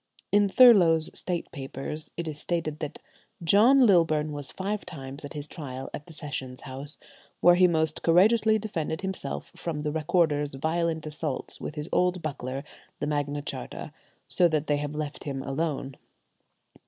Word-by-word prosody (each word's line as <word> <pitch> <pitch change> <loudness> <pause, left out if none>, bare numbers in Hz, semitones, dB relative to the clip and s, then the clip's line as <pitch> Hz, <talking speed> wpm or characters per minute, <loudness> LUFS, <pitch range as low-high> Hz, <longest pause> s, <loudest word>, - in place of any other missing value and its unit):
In 205 0 +4
Thurloe's 185 -10 +6
State 175 -2 -3
Papers 140 +2 -6
it 170 -1 -3
is 150 -1 -4
stated 160 -3 -2
that 150 -3 -5 0.5
"John 235 +10 +6
Lilburne 160 -6 +3
was 145 -2 -3
five 205 +2 -3
times 135 -1 -8
at 145 - -7
his 150 0 -5
trial 135 -5 -7
at 150 - -7
the - - -11
Sessions 130 -4 -5
House, 140 +2 -5 0.4
where 175 - +7
he 180 +1 +6
most 160 -2 0
courageously 215 +6 +5
defended 165 -7 -3
himself 190 -8 -4
from 160 -3 -4
the 150 0 -1
recorder's 150 -2 +1
violent 160 +2 -1
assaults 150 -2 -4
with 150 - -5
his 150 0 -4
old 180 -1 +1
buckler, 135 -3 -4 0.4
the - - -1
Magna 145 -1 -1
Charta, - - -5 0.3
so 175 - +4
that 155 -2 0
they 145 -1 +1
have 145 +1 -4
let 150 -1 -4
him 135 -2 -3
alone." 135 -2 -2
155 Hz, 160 wpm, -27 LUFS, 145-175 Hz, 0.5 s, where